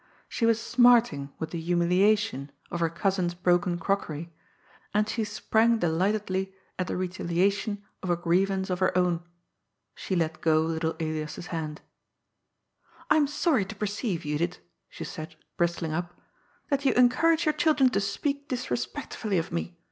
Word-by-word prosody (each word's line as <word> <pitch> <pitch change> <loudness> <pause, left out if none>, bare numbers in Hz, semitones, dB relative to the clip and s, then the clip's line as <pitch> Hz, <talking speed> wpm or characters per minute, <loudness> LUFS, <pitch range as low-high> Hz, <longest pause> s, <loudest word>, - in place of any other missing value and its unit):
She 230 - 0
was 230 -1 +3
smarting 235 - +4
with 160 0 -5
the 170 - -4
humiliation 180 -1 +2 0.2
of 175 - -2
her 165 -1 +2
cousin's 180 0 0
broken 175 0 +2
crockery, 170 -3 -2 0.6
and 210 0 +3
she 225 +1 -1
sprang 220 +2 +2
delightedly 190 +2 0 0.2
at 185 - -1
the - - -2
retaliation 190 +3 0 0.2
of 185 - -4
a 175 - +3
grievance 190 +3 +1
of 180 - -1
her 185 -1 +2
own. 175 -2 +2 0.7
She 190 - -3
let 160 -2 -1
go 155 -1 +4
little 160 0 -1
Elias's 155 0 -3
hand. 155 -2 -4 0.7
" - - -30
I - - +7
am 295 -2 +4
sorry 295 - +2
to 220 - -8
perceive, 205 -2 -2
Judith," 150 +3 -1 0.3
she - - -8
said, 155 +1 -7 0.2
bristling 170 -2 0
up, 175 +1 -4 0.2
" - - -37
that 280 0 +1
you 270 - +3
encourage 320 +7 +4
your 305 - +3
children 295 -4 +3
to 205 - +1
speak 280 +8 -2
disrespectfully 195 - -3
of 170 +2 -2
me. 170 +1 -4
185 Hz, 155 wpm, -27 LUFS, 170-220 Hz, 0.7 s, I